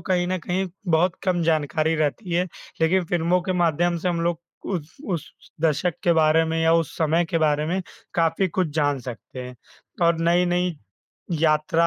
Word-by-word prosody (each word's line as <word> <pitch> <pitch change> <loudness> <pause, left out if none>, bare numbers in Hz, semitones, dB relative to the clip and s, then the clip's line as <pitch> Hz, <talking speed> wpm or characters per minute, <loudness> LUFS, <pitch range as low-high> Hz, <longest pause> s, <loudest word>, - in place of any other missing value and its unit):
कहीं 175 -1 +2
न 185 +1 -1
कहीं 180 +3 -1 0.2
बहुत 170 +3 +3
कम 180 -3 +1
जानकारी 160 0 +1
रहती 160 +5 -1
है, 180 +1 +2 0.4
लेकिन 180 +3 +3
फ़िल्मों 175 +1 +1
के 185 - -1
माध्यम 175 0 +2
से 180 - -1
हम 170 -1 0
लोग 170 0 0 0.3
उस 165 -5 -4
उस 170 -6 -2 0.3
दशक 160 +2 +1
के 170 - +4
बारे 160 0 +4
में 160 0 -1
या 165 - +4
उस 165 -3 +1
समय 165 +2 +2
के 165 0 -1
बारे 150 -1 +2
में 185 +4 0 0.3
काफ़ी 165 +3 +2
कुछ 180 0 0
जान 145 -3 +1
सकते 125 0 -9
हैं 125 0 -7 0.5
और 170 -1 +3
नई-नई 175 +1 +2 0.7
यात्रा 160 +2 +3
165 Hz, 175 wpm, -24 LUFS, 160-175 Hz, 0.7 s, के